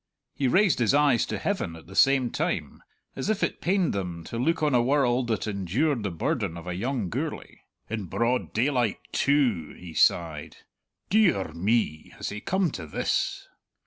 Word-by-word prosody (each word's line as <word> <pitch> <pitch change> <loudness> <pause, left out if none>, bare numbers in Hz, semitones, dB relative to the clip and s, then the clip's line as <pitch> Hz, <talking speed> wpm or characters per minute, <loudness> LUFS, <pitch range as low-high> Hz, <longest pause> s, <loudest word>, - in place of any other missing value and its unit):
He 135 - 0
raised 185 +2 +3
his 120 +3 +3
eyes 145 -5 +3
to - - -3
heaven 185 - -2
at 80 - -13
the 95 - -12
same 135 -3 +4
time, - - -2 0.3
as - - -3
if 215 -1 0
it - - -1
pained 185 0 +1
them 90 -4 -4
to 115 - -5
look 160 +5 +1
on 150 -3 +2
a 125 - +5
world 130 -1 +2
that 110 -3 -1
endured 110 - 0
the 100 - -2
burden 85 0 -2
of 85 - -9
a 90 - -3
young 115 +3 -2
Gourlay. - - -5 0.3
"In 110 -3 -4
broad 120 +7 0
daylight, 125 -2 +1
too!" 125 - +1
he 90 -2 -10
sighed. 80 -1 +1 0.5
"De 215 -3 +6
ar 95 -5 -4
me, 90 -3 0
has - - -4
he 105 +1 -6
come 190 +1 0
to 80 - -7
this?" 75 - -1
120 Hz, 180 wpm, -26 LUFS, 90-145 Hz, 0.5 s, De